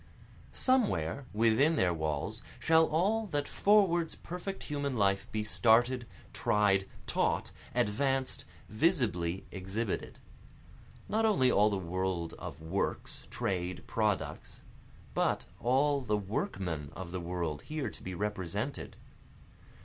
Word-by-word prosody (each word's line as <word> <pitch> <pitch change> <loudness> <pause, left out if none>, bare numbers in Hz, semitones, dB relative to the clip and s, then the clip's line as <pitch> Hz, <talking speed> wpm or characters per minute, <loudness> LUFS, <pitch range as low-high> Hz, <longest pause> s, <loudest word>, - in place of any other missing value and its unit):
Somewhere 140 - +1
within 115 +9 +4
their 90 - +2
walls 80 -3 -2 0.2
shall 160 0 +5
all 205 +8 +1
that 145 -5 -1
forwards 190 -5 +3
perfect 180 +3 -6
human 140 -3 -2
life 100 -1 +1
be 110 -1 -1
started, 120 +3 +3 0.3
Tried, 100 -2 +2 0.2
taught, - - 0 0.2
advanced, 135 +5 0 0.2
visibly 110 - +1
exhibited. 95 +3 -3 0.9
Not 220 +2 +1
only 130 -13 +4
all 105 0 +5
the 100 - -1
world 90 -1 -2
of 70 - -7
works, 90 +5 -3
trade, 90 -1 -2
products, 100 -9 -2 0.5
But - - +1
all 140 +3 +2
the 105 -4 0
workmen 95 -6 -3
of 90 -1 -6
the 90 - -3
world 85 -3 -3
here 150 -8 -3
to - - -14
be 95 -1 -5
represented. 95 -2 -3
105 Hz, 115 wpm, -32 LUFS, 95-145 Hz, 0.9 s, shall